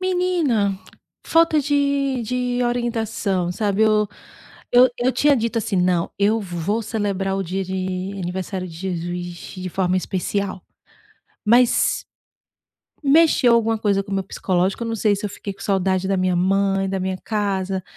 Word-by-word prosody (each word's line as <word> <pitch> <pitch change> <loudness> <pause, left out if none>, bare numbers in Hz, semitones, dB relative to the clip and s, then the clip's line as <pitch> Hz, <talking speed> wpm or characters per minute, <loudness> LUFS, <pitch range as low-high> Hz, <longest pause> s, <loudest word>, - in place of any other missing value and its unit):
Menina 340 - +1 0.5
falta 330 -2 +4
de 280 -2 0
de 250 +1 -1
orientação, 225 -6 -1
sabe, 205 +1 0
eu 215 -1 +3 0.6
eu 250 +1 +7
eu 250 +2 +1
tinha 285 +2 +3
dito 230 0 -1
assim: 205 -2 -2
"Não, 180 -2 +1
eu 215 +3 +2
vou 190 +4 -2
celebrar 200 -3 -2
o 195 - -1
dia 190 +2 -3
de 185 +1 -3
aniversário 185 +1 -4
de 165 - -11
Jesus 175 0 -4 0.4
de 185 - -3
forma 185 0 0
especial". 190 +1 -2 0.8
Mas 240 +2 +3 1.0
mexeu 285 -4 +5
alguma 225 -1 +2
coisa 200 -2 +1
com 195 - -11
o - - 0
meu 195 - -1
psicológico, 190 +2 -1
eu - - -4
não 230 - -2
sei 210 -1 +2
se 205 - -5
eu - - -3
fiquei 200 0 -7
com - - -17
saudade 190 -1 0
da 195 -1 +1
minha 185 -1 +1
mãe, 195 +1 +1
da 190 -1 -2
minha 190 0 -2
casa, 195 -3 -1
200 Hz, 155 wpm, -21 LUFS, 190-235 Hz, 1.0 s, eu